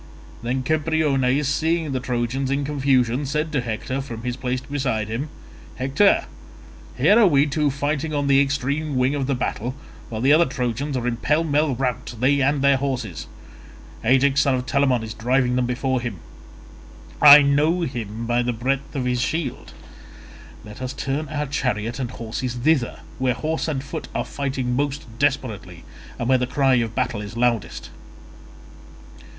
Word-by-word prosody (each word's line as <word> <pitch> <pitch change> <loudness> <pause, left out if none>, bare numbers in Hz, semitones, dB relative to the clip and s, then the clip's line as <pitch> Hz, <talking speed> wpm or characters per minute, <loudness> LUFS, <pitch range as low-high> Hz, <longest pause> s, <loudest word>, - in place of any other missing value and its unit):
Then 125 +2 -2
Cebriones 150 -3 +1
seeing 160 +2 0
the 130 - -1
Trojans 125 +1 -2
in 140 +1 0
confusion 135 -3 +1
said 150 +3 -2
to 140 -4 0
Hector 120 +3 -3
from 115 -4 -8
his 125 -1 -2
place 130 -1 -2
beside 125 -6 -2
him, 130 +7 -3 0.5
"Hector, 140 +11 +3 0.7
here 215 - +5
are 220 - +6
we 145 -4 +4
two 150 0 0
fighting 145 +2 -2
on 145 -1 -1
the 140 0 +5
extreme 140 +2 -1
wing 130 +2 +2
of 140 -3 -2
the 140 - +1
battle, 125 0 -3 0.3
while 110 - -4
the 135 +5 +4
other 165 +2 +5
Trojans 130 +2 -2
are 120 -1 -2
in 120 -1 -1
pell 150 +6 +1
mell 150 -3 +1
rout, 125 -1 -3
they 140 +3 +3
and 140 +1 +1
their 140 -1 +5
horses. 120 - -3 0.8
Ajax 135 +3 +4
son 135 -2 +2
of 125 0 -3
Telamon 130 -3 +1
is 110 -1 -6
driving 125 +2 +1
them 125 -1 +1
before 130 +1 -1
him; 115 -5 -4 1.0
I 150 0 +10
know 150 +5 +2
him 115 -6 -4
by 120 +1 +1
the 120 0 -1
breadth 135 +5 -2
of 130 -2 -1
his 125 -1 0
shield: 160 -2 -3 0.9
let 105 +3 -11
us 130 0 -4
turn 140 +4 -3
our 150 0 -2
chariot 125 -4 -2
and 125 -3 -2
horses 120 +1 -5
thither, 125 - +1 0.2
where 130 -2 +1
horse 160 +5 -2
and 140 -4 -2
foot - - -6
are - - -1
fighting 130 -3 -2
most 145 +1 -2
desperately, 115 - -1 0.3
and 120 - -3
where 130 0 +4
the 125 - -1
cry 135 0 +2
of 115 -2 -2
battle 105 - -1
is 105 +2 -8
loudest." 115 -8 -1
130 Hz, 170 wpm, -22 LUFS, 120-145 Hz, 1.0 s, I